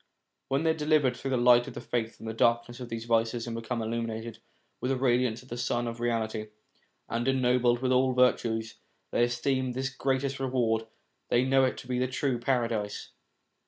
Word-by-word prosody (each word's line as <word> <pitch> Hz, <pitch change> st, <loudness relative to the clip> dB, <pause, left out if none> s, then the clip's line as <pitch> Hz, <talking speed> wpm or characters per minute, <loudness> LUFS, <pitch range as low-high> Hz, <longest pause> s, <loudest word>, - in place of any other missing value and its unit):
When 135 Hz, +3 st, 0 dB
they 160 Hz, -, +4 dB
are -, -, +1 dB
delivered 150 Hz, -4 st, +2 dB
through 135 Hz, -, -5 dB
the 130 Hz, -, +1 dB
light 120 Hz, 0 st, +5 dB
of 120 Hz, -, -8 dB
faith 115 Hz, -2 st, -2 dB
from -, -, -11 dB
the 110 Hz, -, -3 dB
dark 115 Hz, +1 st, +2 dB
ness 120 Hz, +1 st, -10 dB
of 125 Hz, -2 st, -7 dB
these 115 Hz, 0 st, -5 dB
vices, 115 Hz, 0 st, +1 dB
and 115 Hz, -1 st, -4 dB
become 115 Hz, 0 st, -3 dB
illuminated 115 Hz, 0 st, -4 dB, 0.4 s
with 125 Hz, -, -1 dB
the 135 Hz, -, +1 dB
radiance 125 Hz, -2 st, +1 dB
of 130 Hz, -, -19 dB
the 120 Hz, -, -5 dB
sun 120 Hz, 0 st, -1 dB
of 115 Hz, 0 st, -5 dB
reality, 110 Hz, -2 st, -1 dB, 0.6 s
and 120 Hz, +2 st, -2 dB
ennobled 125 Hz, -2 st, +2 dB
with 130 Hz, -, +2 dB
all 130 Hz, +1 st, +3 dB
the 125 Hz, 0 st, +5 dB
virtues, 115 Hz, -2 st, 0 dB, 0.3 s
they -, -, +2 dB
esteem 130 Hz, +1 st, -1 dB
this 130 Hz, +1 st, -2 dB
the 130 Hz, -, -21 dB
greatest 135 Hz, 0 st, 0 dB
reward, 125 Hz, -4 st, +1 dB
and 110 Hz, -, -16 dB, 0.4 s
they 120 Hz, +1 st, +3 dB
know 135 Hz, 0 st, +4 dB
it 130 Hz, -, -1 dB
to -, -, -10 dB
be 125 Hz, -1 st, -1 dB
the 130 Hz, -, +1 dB
true 130 Hz, -1 st, -1 dB
paradise. 115 Hz, -4 st, -1 dB
120 Hz, 210 wpm, -29 LUFS, 115-130 Hz, 0.6 s, light